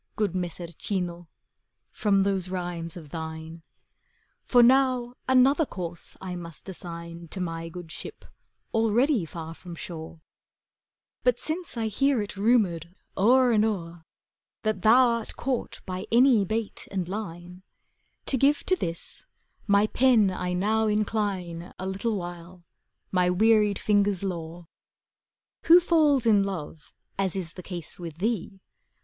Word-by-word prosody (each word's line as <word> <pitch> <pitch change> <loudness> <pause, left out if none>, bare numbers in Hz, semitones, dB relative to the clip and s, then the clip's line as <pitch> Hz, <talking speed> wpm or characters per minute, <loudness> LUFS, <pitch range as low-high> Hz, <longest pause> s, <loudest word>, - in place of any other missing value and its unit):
Good 210 -4 0
Messer 175 -1 -4
Cino, 175 -1 -3 0.6
from 200 -2 +2
those 190 -2 -1
rhymes 175 -2 -4
of 155 -4 -10
thine. 160 +1 -7 0.8
For 245 -2 +6
now 255 -1 +3 0.2
another 260 +4 +5
course 175 - -6
I 185 -1 -5
must 170 0 -9
assign 170 -2 -7
To 190 - -6
my 165 -2 -4
good 170 -1 -9
ship, - - -7 0.5
already 225 - +2
far 165 0 -7
from 175 +1 -10
shore: 160 -1 -7 1.0
But - - +3
since 325 -3 -4
I 225 - -1
hear 270 +5 +2
it 205 -1 -4
rumoured 195 -6 +1 0.2
o'er 250 +5 +5
and 215 -2 +4
o'er 190 -7 -1
^ 170 -1 -16 0.6
That 215 -4 -1
thou 245 +5 +6
art 235 -2 -2
caught 260 -2 -3
by 185 +1 -5
any 235 -3 +5
bait 220 +2 -3
and 185 -3 -2
line, 180 -2 -6 0.6
To 265 - +1
give 280 +3 +3
to 370 - +2
this 170 - -5 0.4
my 200 0 +5
pen 225 -4 +4
I 180 -1 -3
now 215 +4 +1
incline, 200 -5 -2
A 185 - -5
little 195 +4 -1
while, 175 -1 -7 0.5
my 180 -1 +3
wearied 210 +1 +4
fingers' 205 -2 +1
lore. 170 -2 -5 1.0
Who 340 +2 +9
falls 305 -7 +3
in 210 -3 +5
love, 165 -5 -6 0.3
as 195 -2 0
is 180 -3 -4
the 180 - -9
case 175 -2 -8
with 165 -3 -7
thee. 195 -1 -2
195 Hz, 140 wpm, -26 LUFS, 175-225 Hz, 1.0 s, Who